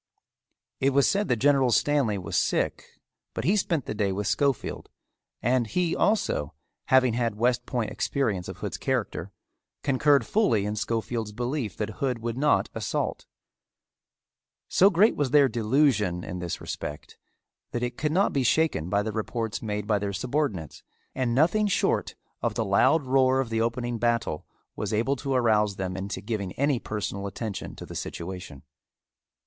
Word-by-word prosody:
It 135 Hz, +1 st, +2 dB
was 140 Hz, 0 st, +4 dB
said 200 Hz, +1 st, +1 dB
that 120 Hz, -, +2 dB
General 135 Hz, +1 st, +3 dB
Stanley 130 Hz, -4 st, +2 dB
was 90 Hz, -3 st, -5 dB
sick -, -, 0 dB, 0.5 s
but -, -, -2 dB
he 190 Hz, -, +3 dB
spent 170 Hz, -, 0 dB
the -, -, -3 dB
day 105 Hz, -2 st, 0 dB
with 100 Hz, +2 st, -2 dB
Schofield 130 Hz, +5 st, -1 dB, 0.5 s
and 120 Hz, 0 st, +2 dB
he 175 Hz, +7 st, 0 dB
also, 195 Hz, -, 0 dB, 0.3 s
having 130 Hz, -2 st, +4 dB
had 115 Hz, -2 st, 0 dB
West 125 Hz, +1 st, +1 dB
Point 115 Hz, -5 st, -2 dB
experience 105 Hz, -11 st, -1 dB
of -, -, -7 dB
Hood's -, -, -5 dB
character, 95 Hz, -, -2 dB, 0.5 s
concurred 140 Hz, +1 st, +3 dB
fully 115 Hz, -, +2 dB
in 105 Hz, +1 st, -2 dB
Schofield's 115 Hz, 0 st, -2 dB
belief 120 Hz, 0 st, -3 dB
that 105 Hz, 0 st, -4 dB
Hood 130 Hz, -3 st, +1 dB
would 115 Hz, 0 st, -4 dB
not 145 Hz, +3 st, +2 dB
assault. -, -, -3 dB, 1.4 s
So 195 Hz, -, +5 dB
great 200 Hz, +4 st, +4 dB
was 145 Hz, -3 st, 0 dB
their 140 Hz, 0 st, +6 dB
delusion 110 Hz, -, +1 dB
in 90 Hz, -, -5 dB
this 85 Hz, -1 st, -4 dB
respect 75 Hz, -, -7 dB, 0.5 s
that 120 Hz, -, -3 dB
it 120 Hz, 0 st, -2 dB
could 150 Hz, +3 st, -1 dB
not 190 Hz, +5 st, +2 dB
be 140 Hz, -, +1 dB
shaken 125 Hz, -, +1 dB
by 100 Hz, +1 st, +1 dB
the 110 Hz, -, -3 dB
reports 110 Hz, 0 st, -3 dB
made 105 Hz, -2 st, -3 dB
by 105 Hz, -1 st, +1 dB
their 100 Hz, 0 st, -3 dB
subordinates, 105 Hz, -, -2 dB, 0.3 s
and 125 Hz, -3 st, 0 dB
nothing 175 Hz, +9 st, +3 dB
short 200 Hz, -, 0 dB, 0.3 s
of -, -, -1 dB
the -, -, 0 dB
loud 130 Hz, +11 st, +4 dB
roar 130 Hz, 0 st, +3 dB
of 130 Hz, -4 st, -2 dB
the 115 Hz, 0 st, +1 dB
opening 120 Hz, 0 st, -1 dB
battle 115 Hz, -9 st, 0 dB, 0.3 s
was -, -, -3 dB
able 115 Hz, +6 st, +1 dB
to 135 Hz, 0 st, -2 dB
arouse 105 Hz, -4 st, +3 dB
them 95 Hz, -1 st, -3 dB
into 95 Hz, 0 st, -4 dB
giving 100 Hz, -3 st, -3 dB
any 140 Hz, -2 st, +1 dB
personal 100 Hz, -2 st, -4 dB
attention 100 Hz, 0 st, -5 dB
to -, -, -9 dB
the -, -, -10 dB
situation. 85 Hz, -6 st, -6 dB
120 Hz, 165 wpm, -26 LUFS, 105-140 Hz, 1.4 s, their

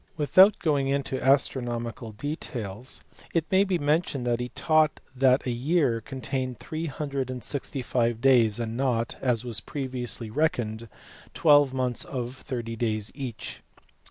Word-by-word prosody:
Without 185 Hz, +7 st, +6 dB
going 145 Hz, -4 st, +1 dB
into 135 Hz, -1 st, -1 dB
astronomical 120 Hz, -4 st, 0 dB
details 120 Hz, -, -4 dB, 0.3 s
it 165 Hz, -2 st, +2 dB
may 190 Hz, +1 st, +5 dB
be 190 Hz, -3 st, 0 dB
mentioned 145 Hz, -3 st, 0 dB
that 120 Hz, -1 st, +1 dB
he 125 Hz, 0 st, -3 dB
taught 155 Hz, +1 st, +2 dB, 0.2 s
that 130 Hz, 0 st, +3 dB
a 125 Hz, -, 0 dB
year 130 Hz, -1 st, +1 dB
contained 130 Hz, +1 st, -4 dB
365 135 Hz, -5 st, -2 dB
days, 120 Hz, -4 st, +4 dB
and 115 Hz, -1 st, -3 dB
not 120 Hz, -3 st, 0 dB
(as 125 Hz, -2 st, 0 dB
was 115 Hz, -4 st, -2 dB
previously 125 Hz, -5 st, -3 dB
reckoned) 115 Hz, -6 st, -1 dB, 0.5 s
twelve 145 Hz, -4 st, +5 dB
months 125 Hz, -2 st, -1 dB
of 125 Hz, -1 st, -5 dB
thirty 120 Hz, -4 st, -5 dB
days 110 Hz, -2 st, -1 dB
each. 130 Hz, -5 st, -6 dB
130 Hz, 130 wpm, -27 LUFS, 120-145 Hz, 0.5 s, Without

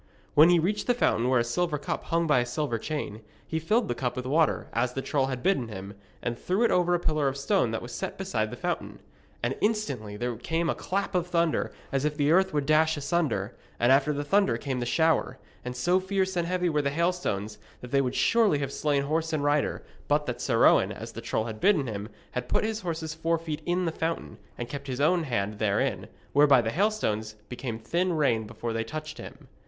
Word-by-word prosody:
When 155 Hz, +3 st, +7 dB
he 175 Hz, -, +6 dB
reached 200 Hz, +6 st, 0 dB
the 245 Hz, -, +3 dB
fountain 125 Hz, -, +2 dB
where 130 Hz, -2 st, +4 dB
a -, -, +2 dB
silver 150 Hz, +6 st, 0 dB
cup 145 Hz, -, -4 dB
hung 165 Hz, 0 st, +1 dB
by 150 Hz, -5 st, +4 dB
a 120 Hz, -, 0 dB
silver 120 Hz, -2 st, -2 dB
chain, 110 Hz, -7 st, -4 dB, 0.2 s
he 160 Hz, -, -2 dB
filled 215 Hz, +8 st, +1 dB
the -, -, 0 dB
cup 125 Hz, 0 st, -2 dB
with 125 Hz, 0 st, -4 dB
water, 155 Hz, +4 st, +2 dB
as 125 Hz, +2 st, 0 dB
the 135 Hz, -, -2 dB
troll 135 Hz, -3 st, +1 dB
had 130 Hz, -2 st, -4 dB
bidden 180 Hz, -10 st, +2 dB
him, 100 Hz, -2 st, -7 dB, 0.3 s
and 120 Hz, -, -1 dB
threw 190 Hz, +6 st, 0 dB
it 235 Hz, -, +3 dB
over 175 Hz, -1 st, +3 dB
a -, -, 0 dB
pillar 155 Hz, -4 st, +1 dB
of 135 Hz, 0 st, -1 dB
stone 140 Hz, -3 st, +1 dB
that 110 Hz, 0 st, -3 dB
was -, -, -8 dB
set -, -, -4 dB
beside -, -, -1 dB
the -, -, -8 dB
fountain. -, -, -3 dB, 0.5 s
And 120 Hz, +3 st, 0 dB
instantly 140 Hz, -, -1 dB
there 120 Hz, +1 st, -2 dB
came 165 Hz, +7 st, -1 dB
a -, -, 0 dB
clap 195 Hz, +1 st, -2 dB
of 180 Hz, -1 st, 0 dB
thunder 170 Hz, -2 st, +1 dB, 0.2 s
as 135 Hz, 0 st, 0 dB
if 150 Hz, 0 st, -1 dB
the 145 Hz, 0 st, +2 dB
earth 190 Hz, +2 st, +4 dB
would 145 Hz, -2 st, 0 dB
dash 155 Hz, +1 st, +3 dB
asunder, 140 Hz, -, -1 dB, 0.2 s
and 120 Hz, +2 st, +4 dB
after 140 Hz, +2 st, +4 dB
the 145 Hz, 0 st, -2 dB
thunder 150 Hz, -, +2 dB
came 130 Hz, +1 st, -3 dB
the 120 Hz, -, -2 dB
shower, 160 Hz, -3 st, +2 dB, 0.3 s
and 125 Hz, 0 st, -5 dB
so 175 Hz, +8 st, +2 dB
fierce 190 Hz, 0 st, -1 dB
and 170 Hz, -1 st, 0 dB
heavy 180 Hz, 0 st, 0 dB
were 150 Hz, -3 st, +1 dB
the 140 Hz, -, 0 dB
hailstones 140 Hz, -, -1 dB, 0.2 s
that 125 Hz, -, -9 dB
they 140 Hz, -, +4 dB
would 125 Hz, -2 st, -2 dB
surely 225 Hz, -9 st, +3 dB
have 140 Hz, -1 st, -3 dB
slain 145 Hz, -2 st, +1 dB
horse 160 Hz, +3 st, -1 dB
and 155 Hz, -2 st, -1 dB
rider, 145 Hz, 0 st, +1 dB, 0.2 s
but 150 Hz, +1 st, +2 dB
that 125 Hz, -2 st, -4 dB
Sir 115 Hz, -4 st, +3 dB
Owen, -, -, +5 dB
as -, -, -7 dB
the -, -, -7 dB
troll 110 Hz, -, -1 dB
had 110 Hz, -2 st, -6 dB
bidden 185 Hz, -, +3 dB
him, 105 Hz, -2 st, -5 dB, 0.2 s
had 125 Hz, 0 st, -4 dB
put -, -, +2 dB
his 220 Hz, 0 st, -1 dB
horse's 160 Hz, -3 st, -3 dB
forefeet 160 Hz, -1 st, -2 dB
in 180 Hz, +1 st, +1 dB
the 165 Hz, -, 0 dB
fountain, 160 Hz, -9 st, -3 dB, 0.2 s
and 120 Hz, -, -4 dB
kept 140 Hz, +2 st, -7 dB
his 130 Hz, -1 st, -3 dB
own 165 Hz, +3 st, +3 dB
hand 105 Hz, -5 st, -2 dB
therein, 100 Hz, -2 st, 0 dB, 0.3 s
whereby 145 Hz, -2 st, +6 dB
the 110 Hz, -1 st, 0 dB
hailstones 115 Hz, -, 0 dB
became 125 Hz, -2 st, -4 dB
thin 175 Hz, +11 st, 0 dB
rain 120 Hz, -9 st, +1 dB
before 115 Hz, +1 st, -4 dB
they 115 Hz, 0 st, -1 dB
touched 155 Hz, +6 st, -7 dB
him. -, -, -10 dB
145 Hz, 230 wpm, -27 LUFS, 120-170 Hz, 0.5 s, When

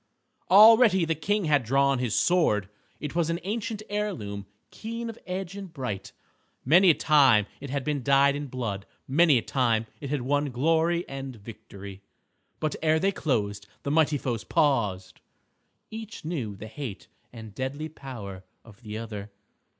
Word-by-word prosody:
Already 215 Hz, -2 st, +7 dB
the 165 Hz, -, +1 dB
King 195 Hz, +6 st, -1 dB
had 145 Hz, -4 st, +3 dB
drawn 135 Hz, +2 st, +2 dB
his 125 Hz, -4 st, -1 dB
sword. 105 Hz, -, +2 dB, 0.3 s
It 150 Hz, -, -5 dB
was 170 Hz, -1 st, 0 dB
an 165 Hz, +1 st, -1 dB
ancient 215 Hz, +1 st, -3 dB
heirloom, 160 Hz, -, -4 dB, 0.2 s
keen 230 Hz, +1 st, -5 dB
of 225 Hz, -, -16 dB
edge 185 Hz, 0 st, -4 dB
and 195 Hz, -3 st, -8 dB
bright. 125 Hz, -, -5 dB, 0.5 s
Many 175 Hz, +7 st, +6 dB
a 160 Hz, -, +6 dB
time 135 Hz, -9 st, +5 dB
it 140 Hz, -, -8 dB
had 140 Hz, 0 st, -2 dB
been 150 Hz, -1 st, -1 dB
dyed 140 Hz, +1 st, +4 dB
in 145 Hz, 0 st, -4 dB
blood; 115 Hz, -7 st, -4 dB, 0.2 s
many 150 Hz, +1 st, +5 dB
a 115 Hz, -, -1 dB
time 115 Hz, -4 st, +1 dB
it 140 Hz, -, -6 dB
had 145 Hz, -3 st, -1 dB
won 145 Hz, +3 st, +1 dB
glory 165 Hz, +6 st, +1 dB
and 135 Hz, -1 st, -6 dB
victory. 100 Hz, -2 st, -11 dB, 0.6 s
But 155 Hz, -2 st, -1 dB
ere 155 Hz, 0 st, +3 dB
they 195 Hz, +5 st, +2 dB
closed, 105 Hz, -, -2 dB, 0.2 s
the 140 Hz, -, -2 dB
mighty 155 Hz, -1 st, +3 dB
foes 120 Hz, -5 st, -3 dB
paused. 105 Hz, -10 st, 0 dB, 0.7 s
Each 220 Hz, -5 st, -8 dB
knew 130 Hz, -, -3 dB
the 100 Hz, -, -9 dB
hate 110 Hz, -, -7 dB, 0.3 s
and 110 Hz, -3 st, -10 dB
deadly 135 Hz, +6 st, -4 dB
power 120 Hz, -11 st, -9 dB, 0.2 s
of 115 Hz, 0 st, -16 dB
the 110 Hz, -2 st, -6 dB
other. 105 Hz, -2 st, -6 dB
140 Hz, 160 wpm, -27 LUFS, 115-170 Hz, 0.7 s, Already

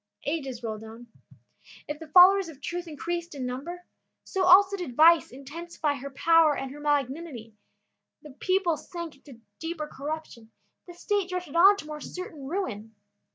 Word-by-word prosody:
Ages 275 Hz, -5 st, -3 dB
rolled 220 Hz, -1 st, -5 dB
on. 225 Hz, +2 st, -11 dB, 0.8 s
If 295 Hz, 0 st, -5 dB
the 320 Hz, -, -9 dB
followers 370 Hz, +3 st, +7 dB
of 290 Hz, -4 st, -12 dB
truth 345 Hz, +4 st, -5 dB
increased 340 Hz, +2 st, -5 dB
in 265 Hz, -2 st, -4 dB
number, 325 Hz, +9 st, -6 dB, 0.4 s
so 385 Hz, -, -2 dB
also 390 Hz, +2 st, +7 dB
did 350 Hz, -11 st, -6 dB
vice 330 Hz, +3 st, +6 dB
intensify 295 Hz, +3 st, -4 dB
her 280 Hz, 0 st, -7 dB
power 320 Hz, +1 st, +4 dB
and 270 Hz, -1 st, -5 dB
her 290 Hz, -, -10 dB
malignity; 285 Hz, -4 st, -2 dB, 0.7 s
the 300 Hz, -, -11 dB
people 360 Hz, +3 st, 0 dB
sank 340 Hz, -4 st, -8 dB
into 270 Hz, -4 st, -16 dB, 0.2 s
deeper 325 Hz, -2 st, -4 dB
corruption, 290 Hz, -6 st, -7 dB, 0.4 s
the 350 Hz, -, -11 dB
state 400 Hz, 0 st, -1 dB
drifted 360 Hz, -4 st, -5 dB
on 390 Hz, +4 st, +7 dB
to 355 Hz, -, -8 dB
more 300 Hz, 0 st, -7 dB
certain 315 Hz, -6 st, -8 dB
ruin. 225 Hz, -, -4 dB
310 Hz, 155 wpm, -27 LUFS, 270-345 Hz, 0.8 s, followers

